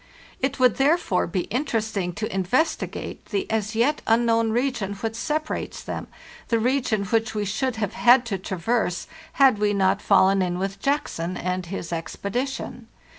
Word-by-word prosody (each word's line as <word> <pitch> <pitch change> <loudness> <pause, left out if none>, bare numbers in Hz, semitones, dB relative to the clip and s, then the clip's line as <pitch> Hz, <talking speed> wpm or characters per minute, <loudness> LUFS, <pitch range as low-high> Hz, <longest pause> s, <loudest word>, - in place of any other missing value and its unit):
It 265 +1 -1
would 250 -3 +4
therefore 275 - +2
be 180 +2 -1
interesting 220 -7 -1
to 215 +2 -4
investigate 250 - -1
the 200 -3 -1
as 215 0 -1
yet 270 +7 +2
unknown 230 0 +3
region 240 -5 -1
which 225 +3 -3
separates 305 +6 -3
them, - - -5 0.4
the 230 - +2
region 235 -3 +1
which 225 +2 0
we 210 -1 -1
should 225 +6 -1
have 215 -1 -2
had 240 +1 +5
to 200 -5 -3
traverse 190 +1 -1 0.3
had 265 -6 +5
we 210 0 +2
not 195 +1 +2
fallen 195 -1 +4
in 180 -1 -1
with 195 +1 -3
Jackson 185 - -1
and 180 0 -2
his 175 -2 -5
expedition. 240 +8 -4
220 Hz, 155 wpm, -24 LUFS, 195-250 Hz, 0.4 s, had